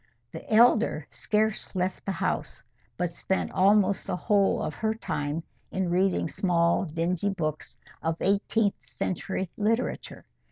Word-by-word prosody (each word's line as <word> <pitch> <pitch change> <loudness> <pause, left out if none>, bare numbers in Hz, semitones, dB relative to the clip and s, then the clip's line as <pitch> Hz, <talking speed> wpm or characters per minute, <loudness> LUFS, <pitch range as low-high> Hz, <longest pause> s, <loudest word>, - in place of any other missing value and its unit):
The - - -9
elder 220 -8 +4
scarce 215 -1 -1
left 185 +1 -2
the - - +1
house, - - -2 0.3
but 175 -1 -1
spent 190 +2 -2
almost 200 +1 +3
the - - -1
whole 200 +1 +2
of - - -3
her 220 0 -1
time 150 -6 -3 0.3
in 185 -2 -1
reading 185 -1 +2
small 170 +1 +1
dingy 170 +4 -1
books 155 -6 -4 0.2
of 165 0 -1
eighteenth 200 +1 +1
century 190 0 -3
literature. 225 +3 -1
190 Hz, 130 wpm, -27 LUFS, 170-210 Hz, 0.3 s, elder